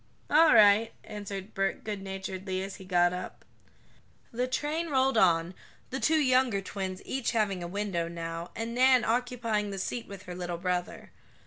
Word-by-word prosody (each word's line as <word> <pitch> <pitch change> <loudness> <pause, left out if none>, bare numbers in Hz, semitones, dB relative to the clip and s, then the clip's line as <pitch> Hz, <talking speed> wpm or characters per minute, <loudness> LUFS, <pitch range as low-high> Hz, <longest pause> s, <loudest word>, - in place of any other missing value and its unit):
"All 310 +2 +6
right," 210 +2 +6
answered 200 -1 -7
Bert 195 -1 -1
goodnaturedly, 190 -2 -4
as 195 - -8
he 190 - -12
got 175 -1 +3
up. 180 - -7 0.9
The 250 +1 -1
train 300 +6 -2
rolled 265 -2 +2
on, 175 -4 +3 0.4
the 265 - -2
two 315 +2 +3
younger 255 -6 +3
twins 190 -1 -5
each 260 -2 -2
having 205 -5 0
a 175 - -4
window 190 -3 -2
now, 165 0 -5
and 225 +1 -4
Nan 255 0 +5
occupying 230 -3 0
the 195 - -5
seat 230 +5 -4
with 200 -1 -9
her 180 - -7
little 175 -1 -4
brother. 180 0 -3
200 Hz, 160 wpm, -29 LUFS, 185-245 Hz, 0.9 s, All